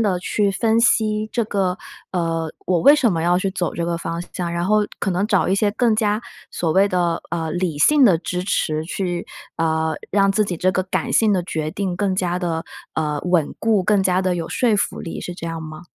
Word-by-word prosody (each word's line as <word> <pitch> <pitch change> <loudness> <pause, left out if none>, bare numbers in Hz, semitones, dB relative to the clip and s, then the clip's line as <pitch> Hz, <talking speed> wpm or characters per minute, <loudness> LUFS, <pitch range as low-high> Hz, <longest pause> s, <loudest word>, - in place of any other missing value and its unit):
地 195 -5 +1
去 200 +2 0
分 225 +3 +2
析 215 -2 +2
这 235 -1 0
个 195 -4 -1 0.4
呃， 165 -2 -1
我 180 -2 +1
为 285 - +7
什 235 -9 +2
么 165 -1 -1
要 175 +1 +3
去 195 +1 -1
走 180 -2 -2
这 170 - -2
个 170 0 -2
方 170 0 -4
向？ 175 -2 -3
然 170 0 -2
后 210 +3 +3 0.2
可 195 - -1
能 185 +3 0
找 200 -3 +2
一 190 - +3
些 205 +1 +2
更 230 -1 +2
加 215 0 0 0.3
所 165 -2 -1
谓 195 +2 +4
的 175 -3 0
呃， 165 -1 -2
理 175 -3 -1
性 295 - +5
的 200 -9 +6
支 180 +2 -4
持 155 -4 -1
去 175 0 -3 0.3
呃， 160 -1 0 0.2
让 195 0 +3
自 215 - +2
己 180 -4 -3
这 185 +3 +1
个 185 - 0
感 185 - -2
性 220 -2 +4
的 180 - 0
决 155 -3 -3
定 190 -1 -3
更 195 -1 0
加 180 -1 -1
地 165 -3 -2 0.3
呃， 150 -2 -1
稳 175 -4 +1
固， 215 -4 +2
更 205 -1 +3
加 185 0 +2
地 185 -1 +1
有 165 -1 -4
说 235 -4 +1
服 205 - -1
力， 165 - -6
是 180 - -6
这 170 - -7
样 165 -1 -4
吗？ 155 +1 -9
180 Hz, 245 characters per minute, -21 LUFS, 170-205 Hz, 0.4 s, 为